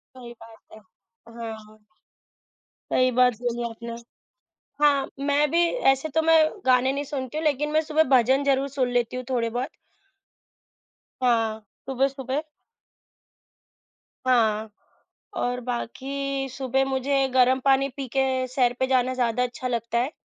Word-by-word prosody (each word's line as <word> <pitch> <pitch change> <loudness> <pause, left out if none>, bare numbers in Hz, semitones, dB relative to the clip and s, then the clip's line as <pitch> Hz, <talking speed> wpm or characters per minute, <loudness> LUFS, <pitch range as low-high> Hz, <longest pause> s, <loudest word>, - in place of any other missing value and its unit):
सही 240 -2 -10
बात 225 -1 -14
है। 220 - -12 0.6
हाँ। 220 -1 -8 1.1
सही 255 0 +3
बात 250 0 +5
बोली 240 0 -2
आपने। 230 +1 -8 0.9
हाँ, 280 -2 +3 0.2
मैं 290 +1 +2
भी 340 +2 +3 0.3
ऐसे 270 +4 -3
तो 320 - +3
मैं 325 0 +5 0.3
गाने 255 +1 +4
नहीं 285 +1 -3
सुनती 270 -1 -5
हूँ 320 - -3
लेकिन 295 0 +1
मैं 310 - +4
सुबह 310 0 +2
भजन 260 +4 +3
ज़रूर 275 0 +1
सुन 260 -2 -1
लेती 240 +1 -3
हूँ 255 - -5
थोड़े-बहुत। 245 +1 -1 1.5
हाँ, 225 -3 +1 0.3
सुबह, 270 0 +1
सुबह। 270 +2 -4 1.8
हाँ। 220 -3 +2 0.7
और 245 0 -1
बाकी 270 +3 -4
सुबह 265 +1 0
मुझे 270 +1 0
गरम 260 +1 +4
पानी 275 0 +3
पी 275 -1 -4
के 260 -1 +1
सैर 250 -1 +2
पे 260 - +2
जाना 255 -1 +1
ज़्यादा 245 -1 0
अच्छा 250 +1 -3
लगता 235 0 -1
है। 260 +6 -1
260 Hz, 135 wpm, -25 LUFS, 240-275 Hz, 1.8 s, बात